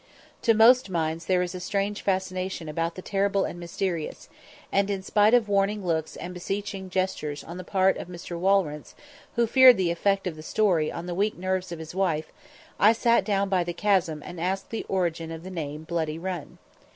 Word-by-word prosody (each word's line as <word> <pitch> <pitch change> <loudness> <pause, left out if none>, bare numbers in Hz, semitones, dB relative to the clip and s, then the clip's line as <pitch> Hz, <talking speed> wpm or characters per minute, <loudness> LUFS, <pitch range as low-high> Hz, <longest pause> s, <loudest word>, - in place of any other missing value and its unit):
To 230 - +4
most 235 +1 +6
minds 165 -1 -2
there 180 -1 +3
is 180 0 -4
a 180 - -5
strange 200 +2 -2
fascination 185 -3 -2
about 165 +2 -2
the 185 - -8
terrible 195 0 +1
and 175 - -6
mysterious, 170 -1 -4 0.4
and, 200 0 +2
in 195 -2 -2
spite 210 +4 +4
of 235 -3 +3
warning 200 0 +1
looks 160 -2 -1
and 180 +1 -7
beseeching 195 +1 -4
gestures 180 -6 -2
on 170 +2 -8
the 185 - -6
part 190 +1 +2
of - - -7
Mr. 175 0 -7
Walrence, 180 -6 +1 0.4
who 235 -1 +3
feared 255 +2 +7
the 180 -3 +1
effect 195 +3 +1
of 180 -3 -3
the 155 - -10
story 170 -3 +1
on 170 - -6
the 175 - -4
weak 205 +4 0
nerves 185 0 -2
of 170 - -5
his 160 0 -8
wife, 170 -5 -1 0.5
I 215 +3 +6
sat 235 +1 +3
down 200 -2 +1
by 190 -2 +1
the 175 0 -4
chasm 175 -5 +1
and 175 -2 -7
asked 190 +2 -2
the 225 - -4
origin 170 -3 -1
of 165 0 -7
the 185 - -8
name 155 -3 -5
Bloody 160 -1 -2
Run. 175 -3 -5
185 Hz, 200 wpm, -26 LUFS, 170-200 Hz, 0.5 s, feared